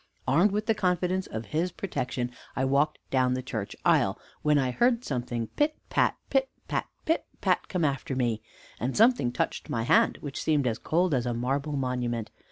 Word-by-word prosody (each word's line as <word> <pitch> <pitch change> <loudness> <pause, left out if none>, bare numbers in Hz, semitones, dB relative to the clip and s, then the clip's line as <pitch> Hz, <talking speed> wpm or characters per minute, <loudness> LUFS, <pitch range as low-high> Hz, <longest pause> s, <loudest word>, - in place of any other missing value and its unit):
Armed 170 +10 +4
with 210 +1 -1
the 225 - +3
confidence 185 -2 0
of 110 +1 -5
his 170 +4 +1
protection; 130 -10 -3 0.2
I 135 - +1
walked 140 +3 +2
down 130 -1 +3
the 130 - -3
church 110 -6 -4
aisle, - - +3 0.2
when 150 -1 +3
I 130 -3 +2
heard 240 - +2
something 120 -3 -2
pit, 300 +1 0
pat, - - +2
pit, 270 -1 +2 0.2
pat, - - -1 0.2
pit, 325 - +1
pat, - - +1
come 180 -4 0
after 135 -1 -1
me, 120 -4 0 0.4
and 125 +3 -2
something 225 - +4
touched 120 - -2
my 115 - -1
hand, - - +4
which 145 -2 -5
seemed 150 -4 +2
as 115 -2 0
cold 175 +1 +1
as 125 -2 +1
a 120 - -1
marble 140 +5 -1
monument. 125 -4 -2
135 Hz, 185 wpm, -28 LUFS, 125-180 Hz, 0.4 s, Armed